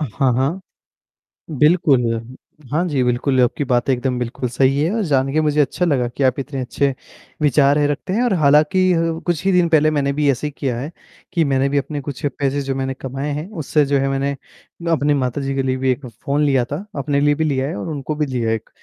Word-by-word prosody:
हाँ, 135 -2 0
हाँ, 140 +9 0 0.9
बिल्कुल, 150 -2 +3
हुँ। 115 +3 -7 0.4
हाँ 160 +4 +1
जी, 140 -5 0
बिल्कुल 125 +2 +1
आपकी 125 +4 +1
बात 125 +1 +1
एकदम 125 0 0
बिल्कुल 125 +1 -3
सही 135 +3 +2
है 165 - +1
और 220 - 0
जान 135 -3 +1
के 155 - +3
मुझे 150 -1 +2
अच्छा 175 +5 0
लगा 130 -7 +1
कि 130 +3 -4
आप 130 +1 +2
इतने 135 0 -5
अच्छे 135 +2 0 0.5
विचार 145 0 +4
रखते 145 +5 -3
हैं 235 +5 +1
और 240 - +2
हालाँकि, 155 +4 +4 0.3
कुछ 175 -1 -1
ही 195 - +3
दिन 180 -2 +3
पहले 155 -1 +4
मैंने 140 -2 0
भी 145 0 +1
ऐसे 135 +4 -3
ही 150 - -5
किया 130 -4 -2
है 145 +5 -5 0.4
कि 170 -3 +2
मैंने 135 0 +1
भी 145 - 0
अपने 145 +1 -2
कुछ 145 +2 -6
पैसे 140 0 0
जो 135 -1 -3 0.3
कमाए 135 +3 -4
हैं, 150 +4 -4
उससे 155 -5 0
जो 140 0 +1
है 135 - 0
मैंने 135 +1 -1 0.6
अपनी 150 -2 +2
माताजी 135 0 -1
के 135 - 0
लिए 130 0 0
भी 130 0 +1
एक 130 +2 -4
फ़ोन 140 +5 -3
लिया 135 -4 +2
था। 160 +9 -5
अपने 140 +1 0
लिए 145 0 +3
भी 160 - -1
लिया 135 -3 0
है - - -4
और 100 - -5
उनको 150 0 -4
भी 150 - 0
लिया 125 -5 -2
है 115 - +2
एक, 110 - -9
140 Hz, 225 wpm, -19 LUFS, 130-150 Hz, 0.9 s, विचार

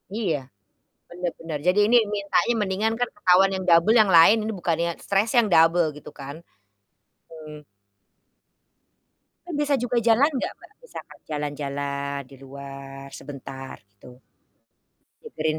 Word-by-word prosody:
Iya, 185 -10 -1 0.7
benar 175 -1 -3
benar. 165 -2 -5
Jadi 185 +3 +3
ini 245 - +5
mintanya 205 +3 0
mendingan 205 +3 0
kan 245 - 0
ketahuan 190 0 +4
yang 190 - -4
double, 170 +7 +5
yang 215 - +5
lain, 205 +7 +7
ini 220 - -2
bukannya 170 -1 -1
stresnya 210 +5 0
yang 205 - -3
double, 165 +1 +4
gitu 150 - -12
kan? 140 0 -8 0.9
Mmm. 155 -2 -11 1.9
Kan 350 - -8
biasa 290 -1 +1
juga 245 0 -1
jalan 250 +7 +5
nggak - - -3
Mbak, - - -18
misalkan - - -11
jalan-jalan, 140 -1 -4
di 135 - -14
luar, 135 0 -10
sebentar 135 -1 -9 0.2
gitu? 100 +5 -17 1.1
Nyegerin 155 0 -3
165 Hz, 130 wpm, -24 LUFS, 140-205 Hz, 1.9 s, lain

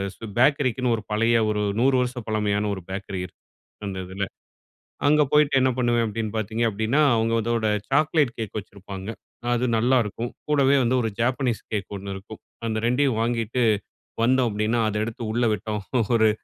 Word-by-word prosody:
சு - - -9
பேக்கரிக்குன்னு 130 -3 +3
ஒரு 110 - -6
பழைய 115 +2 +3
ஒரு 105 0 0 0.2
100 135 +2 +4
வருச 125 0 -1
பழமையான 105 -1 0
ஒரு 95 - -7
பேக்கரி 95 0 -4
இருக்கு. 90 - -16 0.4
அந்த 95 -2 -4
இதில. 95 +2 -3 0.8
அங்க 150 +1 +5
போயிட்டு 150 -2 +4
என்ன 130 0 +3
பண்ணுவேன் 120 -2 +2
அப்படின்னு 110 0 -3
பாத்தீங்க 110 +2 -2
அப்படின்னா, 110 +7 +1
அவுங்க 115 0 +1
அதோட 115 -1 0 0.2
சாக்லேட் 150 -2 +2
கேக் 110 -2 -5
வச்சிருப்பாங்க. 100 -1 -8 0.4
அது 120 +1 +1
நல்லாருக்கும். 120 -1 +1 0.2
கூடவே 140 -2 +4
வந்து 125 +1 +2
ஒரு 115 - 0
ஜாப்பனீஸ் 125 -1 0
கேக் 105 -2 -3
ஒண்ணு 100 0 -6
இருக்கும். 100 +3 -10 0.3
அந்த 110 -1 -1
2டையும் 125 -1 +2
வாங்கிட்டு 115 +1 0 0.6
வந்தோம் 125 0 +3
அப்படின்னா, 110 +3 0
அத 105 - -5
எடுத்து 115 0 -6
உள்ள 120 +1 +1
விட்டோம். 105 +1 -3 0.3
ஒரு 110 -1 +5
115 Hz, 160 wpm, -24 LUFS, 105-125 Hz, 0.8 s, அங்க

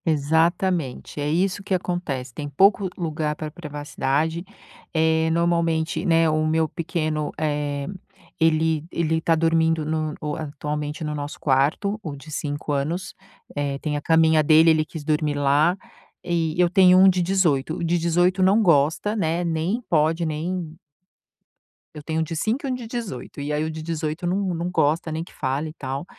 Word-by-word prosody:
Exatamente! 160 -1 0
É 145 - -1
isso 185 +5 0
que 195 -1 -1
acontece, 165 -9 -3
tem 145 +2 -5
pouco 195 +6 +3
lugar 155 -3 -2
para 155 0 -6
privacidade, 150 0 -2 0.5
eh, 160 0 +2
normalmente, 165 -1 +1
né, 165 -1 +4
o 155 0 +1
meu 160 0 +2
pequeno, 155 -2 -2
eh, 145 -2 -1 0.5
ele 160 -1 +2
ele 160 -1 0
está 165 0 +2
dormindo 165 -1 +2
no 155 -1 -2 0.2
atualmente 150 0 -4
no 150 -1 -3
nosso 145 0 -6
quarto, 150 +10 +1
o 155 -7 -6
de 150 +3 -12
5 145 0 -3
anos, 165 +7 -2 0.4
eh, 145 -1 -2
tem 150 +1 -3
a 145 - -2
caminha 160 0 +4
dele, 160 +2 +6
ele 155 -1 +2
quis 155 -1 -8
dormir 150 -1 0
lá. 145 +5 +3 0.5
E 165 -2 -1
eu 175 -1 +4
tenho 185 0 +6
um 190 - +8
de 185 -1 +3
18, 170 -5 +1
o - - -4
de 170 +1 +1
18 175 +3 +2
não 195 +4 +4
gosta, 165 +5 +2
né, 170 -3 0
nem 170 +7 -1
pode, 160 +1 +2
nem 160 +1 -3 1.2
Eu 150 - -8
tenho 160 +2 -2
um - - +2
de 160 +1 -5
5 225 - -1
e - - -2
um - - 0
de 245 -2 -7
18. 225 - -6
E 145 +1 -3
aí, 150 +1 0
o - - -3
de 160 0 -7
18 160 0 -3
não 180 +2 0 0.2
não 170 +2 -2
gosta 160 -1 +1
nem 160 +1 -3
que - - -16
fale 140 +4 -2
e - - -10
tal. 135 0 -5
160 Hz, 175 wpm, -23 LUFS, 150-170 Hz, 1.2 s, um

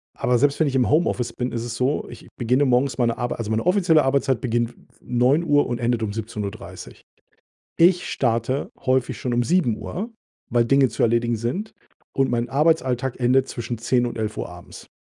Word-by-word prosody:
aber 125 -1 +1
selbst 145 +4 +2
wenn 155 - +3
ich 135 - -2
im 130 -2 +2
Homeoffice 125 -7 +1
bin, 125 +1 -3
ist 115 -1 -3
es 120 -1 -5
so, 130 +5 -1
ich - - -12
beginne 125 +4 +2
morgens 125 0 +1
meine 115 -1 +1
Arbei 120 0 -2
also, 115 -2 -4
meine 110 +5 0
offizielle 180 -4 +4
Arbeitszeit 135 -2 +1
beginnt 120 -1 -1 0.3
09:00 145 +5 +2
und 120 - -3
endet 120 -1 0
um 100 -1 -3
17:30. 105 -2 -7 0.8
Ich 175 +1 +4
starte 120 +2 -1 0.2
häufig 130 -1 +1
schon 125 - -2
um 120 - +2
07:00, 180 - -1 0.4
weil 120 0 +3
Dinge 135 +1 +4
zu 115 - -3
erledigen 120 0 +2
sind 130 - -3 0.4
und 135 -2 +1
mein 120 0 -1
Arbeitsalltag 135 -3 +1
endet 130 +2 +3
zwischen 120 -1 -5
10 120 +1 +1
und 120 - -5
11:00 110 -1 -3
abends. 90 0 -12
125 Hz, 180 wpm, -23 LUFS, 115-140 Hz, 0.8 s, offizielle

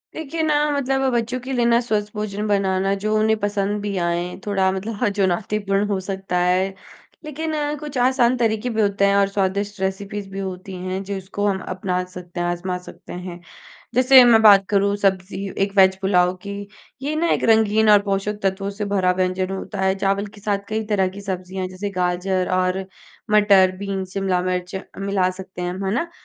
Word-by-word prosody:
देखिए 320 +1 -4
ना 305 -1 +2 0.2
मतलब 270 -1 0
बच्चों 240 +2 -1
के 255 +2 -7
लिए 240 -2 +1
ना 235 0 +4
स्वस्थ 210 -3 -2
भोजन 210 0 -3
बनाना 195 -1 +1
जो 215 0 0
उन्हें 220 +1 +3
पसंद 205 0 -1
भी 205 -1 -3
आए 175 +1 -2
थोड़ा 190 -2 +1
मतलब 205 +3 -2
चुनौतीपूर्ण 200 +1 0
हो 200 -2 -1
सकता 190 -1 -3
है। 185 +2 +1 0.5
लेकिन 315 +2 -4 0.3
कुछ 295 -3 -6
आसान 250 0 +3
तरीके 225 0 0
भी 225 -2 0
होते 200 -1 +2
हैं 200 0 +3
और 200 -1 +4
स्वादिष्ट 200 +1 -2
रेसिपीज़ 195 +1 -3
भी 195 - -5
होती 190 0 -6
हैं 185 +1 -3
जिसको 200 +1 -4
हम 190 -1 0
अपना 185 -1 -2
सकते 175 -1 -8
हैं 175 - 0
आज़मा 180 +1 -2
सकते - - -11
हैं। 180 -1 -7 0.6
जैसे 255 +1 +8
मैं 230 -2 +6
बात 200 -3 +7
करूँ 200 0 +2
सब्ज़ी 195 0 0 0.2
एक 200 - -6
वेज 190 -1 +6
पुलाव 180 -2 +2
की 200 - -4 0.5
ये 295 +3 -2
ना 335 +2 +1
एक - - 0
रंगीन 220 0 +4
और 210 - +8
पोषक 200 +1 -2
तत्वों 195 +1 -1
से 205 +1 -4
भरा 190 -3 +1
व्यंजन 185 0 0
होता 195 +1 -5
है 190 0 +2
चावल 195 +1 0
के 205 0 -14
साथ 205 0 0
कई 220 +1 -1
तरह 195 -3 +1
की 200 +2 -9
सब्ज़ियाँ 185 -1 -4
जैसे 185 +2 -5
गाजर 180 0 -1
और 185 +1 0 0.5
मटर, 200 -3 +5
बीन्स, 195 -1 -4
शिमला 190 -2 0
मिर्च 180 +1 -3 0.2
मिला 195 -2 +1
सकते 185 -1 -8
हैं 175 - -1
हम, 190 +2 -5
है 190 - 0
ना? 335 +7 -2
195 Hz, 190 wpm, -21 LUFS, 185-210 Hz, 0.6 s, जैसे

